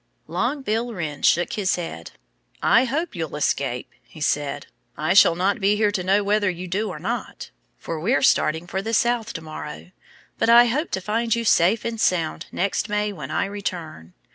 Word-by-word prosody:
Long 290 -2 -2
Bill 230 +1 -1
Wren 155 -5 -4
shook 175 +1 +3
his 200 -3 +1
head. 165 - -7 0.5
"I 255 - +4
hope 295 - -2
you'll 160 -4 -4
escape," 135 -4 -1
he 160 - -15
said. 145 -1 -1 0.3
"I 155 +4 +1
shall 190 -4 +6
not 195 +5 0
be 200 +2 +3
here 210 -1 +2
to 190 -3 -2
know 195 +3 +2
whether 205 0 +2
you 180 0 -5
do 205 +4 -1
or - - -6
not. - - -5 0.3
For 165 - -5
we're 230 +13 +1
starting 160 -10 +2
for 190 +2 -3
the 225 +3 -1
South 235 0 +1
to 165 - -6
morrow. 90 - -8 0.5
But - - +2
I 240 +1 +8
hope 285 +8 -1
to 190 - -1
find 225 +3 0
you 235 0 -2
safe 205 +3 +3
and 225 -1 -3
sound 165 -2 0
next 200 +2 -1
May, 210 0 -1
when 155 - -7
I - - 0
return." 175 - -6
195 Hz, 190 wpm, -23 LUFS, 160-225 Hz, 0.5 s, I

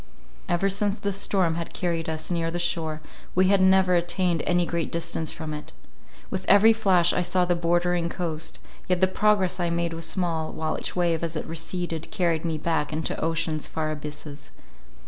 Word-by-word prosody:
Ever 175 +2 +2
since 200 +1 0
the 200 -2 -2
storm 190 -3 +1
had 170 0 -5
carried 170 -2 -1
us 160 +2 -4
near 165 -1 0
the 170 - -3
shore, 160 -3 -1 0.3
we 185 +1 +4
had 200 -1 +4
never 190 -1 +5
attained 175 -1 +1
any 175 -1 +3
great 170 -1 -2
distance 165 -1 -2
from 155 -1 -5
it. 150 0 -8 0.6
With 190 0 -2
every 210 +3 +7
flash 185 -6 +3
I - - +1
saw 180 +1 +1
the 175 - +2
bordering 175 0 +1
coast; 165 -3 -3 0.3
yet 180 -1 +1
the 185 - +6
progress 190 -1 +2
I 175 -1 +1
made 170 0 -1
was 165 0 -2
small, 165 -4 -1
while 155 0 -2
each - - -3
wave, 170 -2 +1
as 165 0 -3
it - - -3
receded, 165 0 -4
carried 170 -3 0
me 165 -2 -1
back 160 -2 -1
into 155 +1 -2
ocean's 160 -1 -1
far 155 -1 -2
abysses. 150 -1 -7
170 Hz, 185 wpm, -25 LUFS, 160-180 Hz, 0.6 s, every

